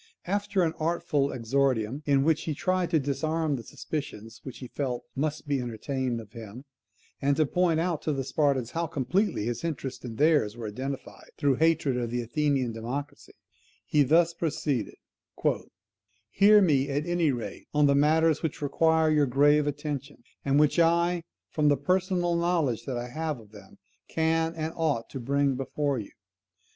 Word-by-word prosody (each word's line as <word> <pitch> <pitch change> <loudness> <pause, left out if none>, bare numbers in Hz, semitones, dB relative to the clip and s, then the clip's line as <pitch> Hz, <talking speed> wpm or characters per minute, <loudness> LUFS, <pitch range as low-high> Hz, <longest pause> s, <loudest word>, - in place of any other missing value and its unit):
After 200 0 0
an 160 -1 0
artful 160 -3 0
exordium, 130 0 0
in 140 -1 +4
which 160 0 +1
he 155 - -2
tried 185 +2 0
to 165 -2 +3
disarm 155 +2 -1
the 125 - -5
suspicions 115 -5 -6
which 130 - -8
he 125 - -8
felt 125 -2 -3
must 150 +2 -2
be 140 -2 0
entertained 125 +1 -3
of 110 -2 -11
him, 115 +3 -10 0.6
and 140 0 +2
to 155 - +4
point 170 +2 +1
out 170 -2 -1
to 155 - -1
the 135 -2 -1
Spartans 135 -4 0
how 170 0 -1
completely 160 - 0
his 120 +5 -3
interests 145 -5 -4
and 115 -3 -7
theirs 145 -8 +3
were 115 -2 -5
identified, 130 +6 -6
through 140 -1 +2
hatred 160 -5 +2
of 120 -2 -2
the 120 +1 -2
Athenian 135 0 0
democracy, 125 +6 -6 0.5
he 150 - +2
thus 165 +5 +4
proceeded: 145 -7 -2 1.4
"Hear 205 +1 +6
me, 140 -5 +2
at 145 +2 -1
any 175 -3 +2
rate, 120 -3 -6
on 150 0 +3
the 140 - +4
matters 155 +2 +3
which 160 - -3
require 160 +2 +2
your 150 -2 +3
grave 145 +3 +4
attention, 145 -1 -4 0.2
and 140 +1 +2
which 150 +3 +3
I, 170 +1 +3 0.3
from 150 -1 +1
the 145 -1 +4
personal 180 +2 +1
knowledge 170 -8 0
that 130 -3 -3
I 120 +1 -4
have 155 +1 -3
of 105 -2 -16
them, 100 -3 -15 0.3
can 160 0 0
and 160 0 -3
ought 150 -8 -1
to 135 - -5
bring 140 +2 +1
before 135 +1 -1
you. 105 - -7
145 Hz, 170 wpm, -27 LUFS, 130-160 Hz, 1.4 s, Hear